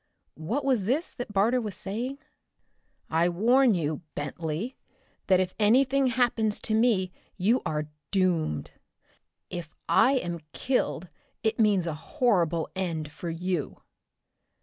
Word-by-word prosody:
What 270 +8 -1
was 250 -8 +2
this 280 - 0
that 245 -3 -6
Barter 220 +5 +3
was 210 -4 -5
saying? 235 +8 -4 0.9
"I 165 +2 +2
warn 235 +6 +4
you, 155 -2 -1
Bentley, 160 - -3 0.5
that 185 -2 +5
if 185 -1 0
anything 265 +5 +4
happens 235 -4 +1
to 220 - -2
me 215 -5 +3 0.3
you 215 +7 +2
are 150 -1 -2 0.2
doomed. 165 - 0 0.8
If 175 -3 -5 0.2
I 265 - +5
am 175 -10 -1
killed 245 - -1 0.4
it 220 0 0
means 205 -5 +4
a 165 - -2
horrible 170 -2 +1
end 165 -5 -3
for 170 +3 -6
you." 170 -1 -2
195 Hz, 125 wpm, -27 LUFS, 170-245 Hz, 0.9 s, that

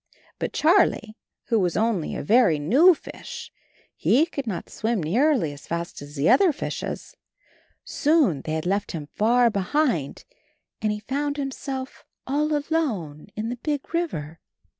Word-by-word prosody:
'' - - -32
But - - -2
Charlie 310 - +3 0.4
was 185 -7 +2
only 215 -7 0
a - - -4
very 210 - +4
new 275 - +5
fish; - - -9 0.4
he 285 +7 +3
could 280 -6 -6
not 190 -6 -4
swim 220 -4 -2
nearly 225 - +2
as 145 - -13
fast 170 -1 -4
as 145 +1 -10
the 140 +1 +1
other 385 -4 +6
fishes; 305 - -5 0.7
soon 290 - +2
they 155 - -4
had 160 +1 -2
left 200 +3 -1
him 150 -3 -6
far 235 +2 +3
behind, 200 - 0 0.6
and 215 -1 +1
he 210 0 -4
found 285 +5 -2
himself 270 -1 -5 0.2
all 300 +3 +1
alone 245 - -2
in 220 +1 -3
the 245 - -4
big 290 +4 -4
river. 165 - -3
230 Hz, 150 wpm, -24 LUFS, -, 0.7 s, other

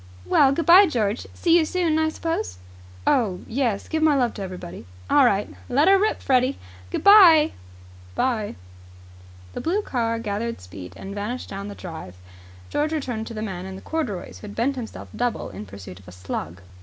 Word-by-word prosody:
"Well, 270 - +4
good 325 +4 -1
bye, 370 +4 +8
George. 220 -6 -1
See 335 -1 +3
you - - +3
soon, 320 -1 0
I 315 0 +2
suppose?" 315 - -3 0.5
"Oh, 215 -9 +1
yes. 235 -4 -1
Give 315 - -1
my 310 -2 +4
love 245 -4 +1
to 205 - -8
everybody." 185 - -8 0.2
"All 285 -2 +6
right. 205 -4 +2 0.2
Let 280 +6 +3
her 390 0 +6
rip, 430 +2 0
Freddie. 260 0 +2 0.3
Good - - -3
bye." 355 -7 +8 0.5
"Good 90 - -21
bye." 230 -5 -1 1.0
The - - -5
blue 390 +6 0
car 230 - -1
gathered 230 +1 -3
speed 90 0 -10
and 195 - -8
vanished 210 +5 -4
down 200 +1 -6
the 205 - -7
drive. 160 - -8 0.6
George 305 +2 0
returned 245 -7 -3
to 230 - -7
the 215 - -4
man 190 -3 -5
in 190 0 -7
corduroys, 275 - -4
who 210 - -9
had 205 - -9
bent 265 +5 0
himself 240 -4 -7
double 245 - -2
in 100 +2 -8
pursuit 95 -1 -10
of 95 - -19
a - - -10
slug. 90 -1 -6
230 Hz, 190 wpm, -23 LUFS, 190-305 Hz, 1.0 s, bye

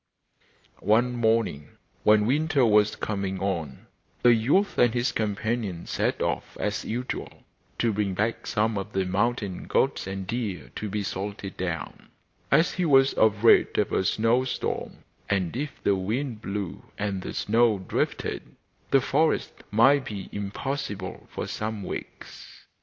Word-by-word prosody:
One 120 +5 +2
morning, 110 -11 0 0.3
when 105 0 +5
winter 145 +1 +2
was 105 -1 +4
coming 100 -2 -3
on, 85 -8 -3 0.4
the 120 - +7
youth 140 - +2
and 120 -1 +4
his 120 0 +1
companions 110 -4 -2
set - - 0
off - - -3
as - - -1
usual 125 +3 -5 0.3
to 115 -2 +1
bring 100 -2 -1
back 110 +4 -1
some 110 -1 +1
of 95 - -7
the 95 -1 +1
mountain 100 0 -1
goats - - +1
and 95 0 -4
deer 95 - -4
to 105 - -4
be 105 +1 -2
salted 100 0 -5
down, 85 -3 -5 0.4
as 165 - +4
he 180 - -1
was 135 -4 +5
afraid 110 +1 +4
of - - +1
a - - +2
snow 115 +6 +2
storm; 130 - -4 0.3
and 95 -3 0
if 145 +4 -2
the - - +3
wind 110 +5 -2
blew 100 -3 -4 0.2
and 100 -2 -2
the - - -5
snow 115 0 +3
drifted 95 - -3 0.3
the 135 - +5
forest 155 +5 +1 0.2
might 130 +6 +5
be 100 -5 -6
impassable 100 -1 -4
for - - -4
some 110 -1 -4
weeks. - - -8
105 Hz, 145 wpm, -26 LUFS, 95-120 Hz, 0.4 s, the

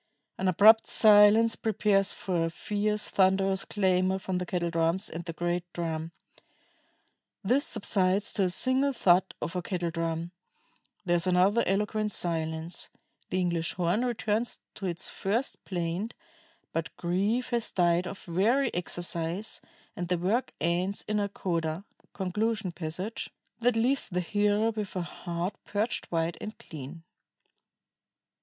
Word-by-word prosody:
An 190 - 0
abrupt 215 +5 +6
silence 215 +1 +6
prepares 205 -2 +2
for 175 -3 -1
a - - -1
fierce, 210 +4 -1
thunderous 190 0 +2
clamor 190 -2 +1
from 185 -1 -3
the 180 - -4
kettle 170 -2 -1
drums 165 +5 +1
and 170 +1 -5
the 170 - -4
great 175 +1 -1
drum. 165 -1 -3 1.3
This 250 +8 +2
subsides 195 -2 +1
to 195 - +2
a - - +1
single 260 +8 +2
thud 190 -5 +3
of 170 - -4
a 180 - 0
kettle 175 -2 -2
drum; 165 0 -3 0.7
there 175 -1 +3
is 170 - +1
another 185 +5 +4
eloquent 210 +2 0
silence; 160 -1 -2 0.4
the 185 - 0
English 170 -2 0
horn 180 +6 +1
returns 230 -1 -1 0.2
to 195 - -5
its 170 0 0
first 225 +7 -2
plaint; 180 +4 -3 0.6
but 165 0 -3
grief 200 +8 0
has 235 -2 0
died 175 0 +2
of 200 - -6
very 225 +10 +1
exercise, 175 +2 -1 0.3
and 175 - -4
the 180 0 +1
work 215 +9 0
ends 175 +5 -1
in 210 0 0
a 200 0 -1
coda 170 -2 -2 0.3
[conclusion 205 +1 -1
passage] 180 +6 -5 0.3
that... 240 0 +2
leaves 250 +4 +1
the 180 -1 -1
hearer 210 +4 +1
with 215 -3 -5
a 180 - -1
heart 175 +2 -4
purged 210 +3 -2
white 165 0 -1
and 215 - -6
clean." 155 +2 -9
185 Hz, 140 wpm, -28 LUFS, 170-210 Hz, 1.3 s, abrupt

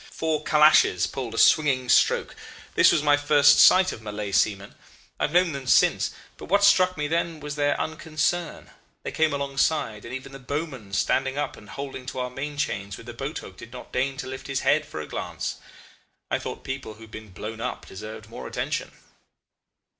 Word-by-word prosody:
Four 160 -2 -2
Calashes 150 - +5
pulled 120 -4 -5
a - - -6
swinging 135 -4 +4
stroke. - - +3 0.4
This - - +6
was 150 - +1
my 145 -1 +4
first 145 0 +5
sight 185 0 +7
of - - -8
Malay 105 -1 -5
seamen. 100 0 +1 0.5
I've - - 0
known 180 0 +3
them 135 -3 -6
since, - - +4 0.3
but - - -9
what 200 +3 +2
struck 185 -3 +5
me 150 0 -1
then 165 0 -1
was 150 0 -6
their 145 -1 +1
unconcern: 160 +1 -2 0.3
they - - -4
came 160 -1 +2
alongside, 140 -5 -1
and 115 - -9
even 130 +1 -7
the 135 - -10
bowman 135 -5 -5
standing 135 +6 0
up 145 - -2
and 105 - -15
holding 135 -2 -7
to 130 - -5
our 125 0 -3
main 145 +3 -5
chains 100 -7 -3
with - - -12
the 120 - -8
boat 135 +5 -5
hook 95 - -10
did 115 - -11
not 125 0 -10
deign 135 +1 -1
to - - -5
lift 130 0 -7
his 135 -1 -2
head 155 0 +2
for 80 - -6
a 75 - -8
glance. - - -4 0.7
I - - +1
thought - - -7
people 135 -5 -6
who 110 - -18
had 110 -1 -13
been 110 -1 -9
blown 110 +4 -7
up 125 - -4
deserved 105 +3 -9
more - - -8
attention. - - -3
135 Hz, 200 wpm, -25 LUFS, 115-150 Hz, 0.7 s, sight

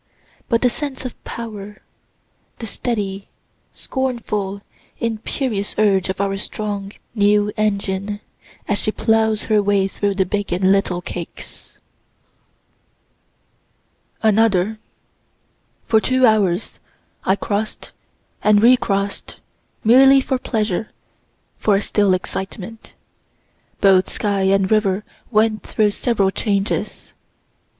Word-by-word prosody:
But 230 0 +2
the 250 - +5
sense 280 -2 -5
of 255 - -8
power 210 -3 -7 0.8
the 230 - -6
steady, 200 -4 -3 0.4
scornful, 210 -7 -3 0.3
imperious 225 -1 -2
urge 195 -3 +3
of 190 - -3
our 195 0 0
strong 205 -1 -4 0.2
new 205 -1 +3
engine, 205 -1 -1 0.5
as 205 - +1
she 215 - -1
ploughs 220 -1 +1
her 215 -2 +2
way 200 -1 +2
through 200 0 -2
the 190 -1 +2
big 205 +1 -3
and 185 +2 +2
little 190 -3 +1
cakes. 170 -1 -9 2.5
Another. 215 -1 +3 1.1
For 220 -1 +3
two 260 +2 +3
hours 205 -4 +1 0.4
I 190 - +2
cross'd 210 +1 -3 0.5
and 210 -1 +5
recross'd, 205 -4 +2 0.5
merely 270 +4 +7
for 260 -1 -1
pleasure 215 -4 -1 0.7
for 210 - +3
a - - +3
still 205 -3 +2
excitement. 195 +4 -6 0.9
Both 190 -2 +5
sky 200 -2 -1
and 195 0 +2
river 210 -2 +2 0.3
went 215 -1 +2
through 210 -2 +1
several 205 -3 +1
changes. 200 -1 -2
205 Hz, 105 wpm, -20 LUFS, 195-220 Hz, 2.5 s, merely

